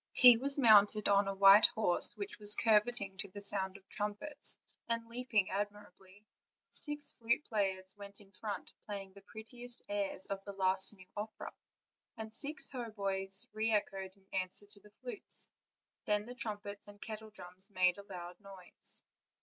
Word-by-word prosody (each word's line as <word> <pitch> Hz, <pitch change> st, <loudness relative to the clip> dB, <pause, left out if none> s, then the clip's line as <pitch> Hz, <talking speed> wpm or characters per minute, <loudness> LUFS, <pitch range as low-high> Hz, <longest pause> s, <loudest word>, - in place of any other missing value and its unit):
He 250 Hz, -2 st, +8 dB
was 275 Hz, +4 st, +2 dB
mounted 215 Hz, -4 st, +5 dB
on 200 Hz, 0 st, +3 dB
a 195 Hz, -, -3 dB
white 195 Hz, +2 st, +8 dB
horse 210 Hz, -5 st, +2 dB
which 405 Hz, -, -7 dB
was 210 Hz, 0 st, +4 dB
curveting 210 Hz, -3 st, +2 dB
to 200 Hz, -, +5 dB
the 200 Hz, +2 st, -10 dB
sound 195 Hz, -1 st, +1 dB
of 195 Hz, -, -23 dB
trumpets, 210 Hz, +8 st, -1 dB, 0.3 s
and 230 Hz, 0 st, -2 dB
leaping 230 Hz, -4 st, -1 dB
admirably; 205 Hz, 0 st, -7 dB, 0.5 s
six 295 Hz, -1 st, +3 dB
flute 235 Hz, +4 st, -2 dB
players 190 Hz, -4 st, -3 dB
went 200 Hz, 0 st, -11 dB
in 200 Hz, -2 st, -17 dB
front, 205 Hz, +1 st, -1 dB
play 205 Hz, -2 st, -6 dB
ing 190 Hz, -1 st, -19 dB
the 200 Hz, -, -15 dB
prettiest 240 Hz, +4 st, -1 dB
airs 200 Hz, -2 st, -4 dB
of 195 Hz, 0 st, -6 dB
the 200 Hz, -, -8 dB
last 190 Hz, 0 st, +4 dB
new 185 Hz, -2 st, -17 dB
opera; 215 Hz, +1 st, -7 dB, 0.6 s
and 220 Hz, 0 st, -8 dB
six 295 Hz, +2 st, +1 dB
haut 240 Hz, -5 st, -7 dB
boys 195 Hz, -1 st, 0 dB
re 220 Hz, +1 st, -1 dB
echoed 195 Hz, -2 st, -2 dB
in 195 Hz, -, -28 dB
answer 185 Hz, +1 st, 0 dB
to 205 Hz, 0 st, -16 dB
the 210 Hz, -, -19 dB
flutes; 475 Hz, -5 st, -8 dB, 0.5 s
then 210 Hz, 0 st, 0 dB
the 245 Hz, -, -9 dB
trumpets 205 Hz, -4 st, -7 dB
and 205 Hz, 0 st, -14 dB
kettledrums 210 Hz, -4 st, -10 dB
made 185 Hz, -1 st, +1 dB
a -, -, -10 dB
loud 175 Hz, -1 st, -9 dB
noise. 195 Hz, -3 st, -11 dB
205 Hz, 165 wpm, -33 LUFS, 195-220 Hz, 0.6 s, He